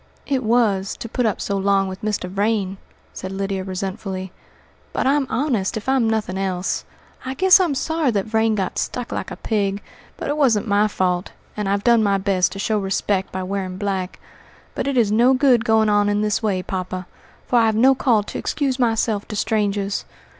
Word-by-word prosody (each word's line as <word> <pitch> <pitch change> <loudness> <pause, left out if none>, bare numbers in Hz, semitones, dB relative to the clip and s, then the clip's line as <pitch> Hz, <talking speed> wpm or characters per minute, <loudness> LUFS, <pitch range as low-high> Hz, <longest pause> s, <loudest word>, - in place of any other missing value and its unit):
"It 270 -2 -1
was, 215 -4 +1
to - - -6
put 235 +1 0
up 210 - -1
so 200 - -2
long 195 0 +2
with 190 0 -7
Mr. 210 -3 -2
Vrain," 195 0 -1 0.4
said 190 - -6
Lydia 195 0 -2
resentfully; 190 0 -4 0.6
"but - - -1
I'm 275 0 +2
honest, 235 -9 0
if 220 - -7
I'm 260 -4 +2
nothing 210 -4 -1
else. 190 -1 -2 0.4
I 260 0 -4
guess 375 +5 +6
I'm 345 -7 +1
sorry 320 +2 0
that 200 -4 0
Vrain 220 0 +1
got 190 -3 -2
stuck 245 -1 -3
like - - -3
a - - -6
pig; 200 -2 -1 0.4
but - - -5
it 290 +1 -1
wasn't 240 -7 +2
my 205 +1 +3
fault, 185 -2 -1 0.2
and 210 -2 -2
I've 200 0 0
done 235 -2 +5
my 200 -2 +2
best 190 -2 +1
to - - -8
show 210 +2 0
respect 195 0 -1
by 190 0 -4
wearing 185 -1 -3
black. 190 -2 -3 0.5
But - - -3
it 275 -2 0
is 220 -4 +3
no 240 +5 +4
good 255 -4 +4
going 220 -1 +3
on 205 -1 +3
in 205 0 +1
this 210 -1 0
way, 195 -4 0
poppa, 185 -1 -4 0.4
for 245 - +3
I've 220 -1 +3
no 260 +5 +5
call 235 -5 +2
to - - -6
excuse 275 -3 -1
myself 225 -3 +1
to 210 - -6
strangers. 205 -2 0
210 Hz, 195 wpm, -21 LUFS, 195-235 Hz, 0.6 s, guess